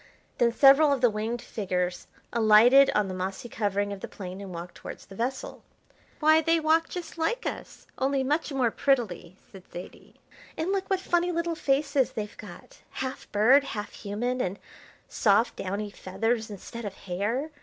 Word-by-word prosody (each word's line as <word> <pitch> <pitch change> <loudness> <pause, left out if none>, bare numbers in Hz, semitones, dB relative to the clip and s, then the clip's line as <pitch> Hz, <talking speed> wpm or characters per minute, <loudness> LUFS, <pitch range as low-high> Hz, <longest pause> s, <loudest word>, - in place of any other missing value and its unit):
Then 235 -1 +4
several 275 +4 +6
of 275 -3 0
the 245 -3 +4
winged 220 +3 -3
figures 180 -3 -3 0.3
alighted 235 +5 +6
on 210 -2 +2
the 185 - -5
mossy 190 +5 -4
covering 205 -2 -1
of 200 - -8
the - - -6
plain 185 0 -8
and 195 -2 -8
walked 175 +1 -7
towards - - -10
the - - -13
vessel. 265 - -4 0.6
"Why, 315 +1 +5
they 330 +1 +2
walk 320 +1 +2
just 345 -2 -7
like 470 +10 -1
us, - - -6
only 270 0 +1
much 300 +4 -1
more 255 -4 +1
prettily!" 220 -11 -1
said 190 -2 -14
Zaidie. 175 - -10 0.4
"And 330 +4 -1
look 390 -1 -2
what 385 -1 +1
funny 350 -1 +1
little 335 0 -1
faces 280 -3 +1
they've 210 -1 -5
got! - - -12
Half 260 0 -6
bird, 245 +7 +5
half 210 -6 -6
human, 245 +5 -3
and 185 -1 -2 0.5
soft, 220 +2 +2
downy 200 +2 -4
feathers 225 +4 -2
instead 210 +3 -8
of 200 -2 -5
hair. 215 - -3
235 Hz, 170 wpm, -27 LUFS, 200-285 Hz, 0.6 s, several